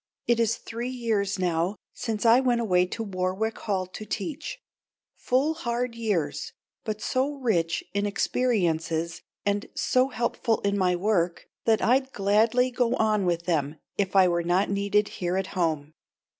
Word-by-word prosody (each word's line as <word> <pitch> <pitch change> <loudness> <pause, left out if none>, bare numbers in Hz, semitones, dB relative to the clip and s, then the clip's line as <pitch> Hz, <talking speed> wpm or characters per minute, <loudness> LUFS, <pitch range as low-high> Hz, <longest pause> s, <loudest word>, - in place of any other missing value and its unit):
It 235 -1 +2
is 230 0 +2
three 235 +2 -5
years 220 -6 -1
now 175 +1 0 0.2
since 225 -2 -3
I 230 +2 +7
went 250 -2 +2
away 180 -5 +2
to 225 - -4
Warwick 190 +2 -2
Hall 190 -3 -1
to 185 +4 -9
teach; 280 - -4 0.6
full, 270 +5 +1
hard 245 -5 -2
years, 175 -11 -2 0.3
but 215 -1 -4
so 270 +3 0
rich 190 -11 0
in 200 +1 0
experiences 170 -8 0 0.2
and 205 0 0
so 255 +1 +2
helpful 235 -1 0
in 200 0 +1
my 185 -2 +2
work 175 -2 0 0.2
that 225 -1 +3
I'd 265 +3 +2
gladly 220 +5 +3
go 245 -1 +1
on 215 -3 +2
with 170 -1 0
them 155 -3 0 0.2
if 195 -1 -1
I 190 -1 +7
were 170 -1 +1
not 180 +4 +1
needed 200 +1 +2
here 180 +1 0
at 190 0 -1
home. 155 -4 -1
205 Hz, 155 wpm, -26 LUFS, 180-235 Hz, 0.6 s, I